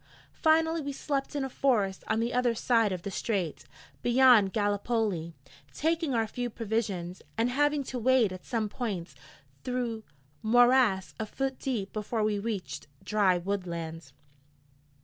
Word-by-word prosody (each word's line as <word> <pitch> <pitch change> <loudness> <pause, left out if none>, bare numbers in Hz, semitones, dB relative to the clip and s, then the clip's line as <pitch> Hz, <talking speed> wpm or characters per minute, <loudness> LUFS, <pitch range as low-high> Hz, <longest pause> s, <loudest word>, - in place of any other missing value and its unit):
Finally 320 0 +3
we 285 -1 -4
slept 275 0 -3
in 285 - 0
a - - -2
forest 215 -8 +1
on 220 +1 +1
the 235 +2 -1
other 245 -1 +2
side 225 -2 +2
of 180 -2 -4
the 200 - -4
strait, 190 -6 -2 0.4
beyond 240 -5 +5
Gallipoli, 205 -4 -1 0.4
taking 320 -3 0
our 225 -1 +2
few 245 +3 -4
provisions, 205 -6 -3 0.2
and 230 +2 +1
having 290 +2 +2
to 255 -1 -5
wade 240 -4 +3
at 185 - -9
some 225 -3 -1
points 200 -6 -4 0.5
through 245 -3 -2 0.4
morass 240 -3 +4
a 220 - -2
foot 270 +3 -3
deep 220 -8 -3
before 215 +1 -2
we 210 -1 +1
reached 205 -7 -4 0.2
dry 200 -4 +3
woodland. 170 -5 -4
225 Hz, 145 wpm, -29 LUFS, 200-255 Hz, 0.5 s, beyond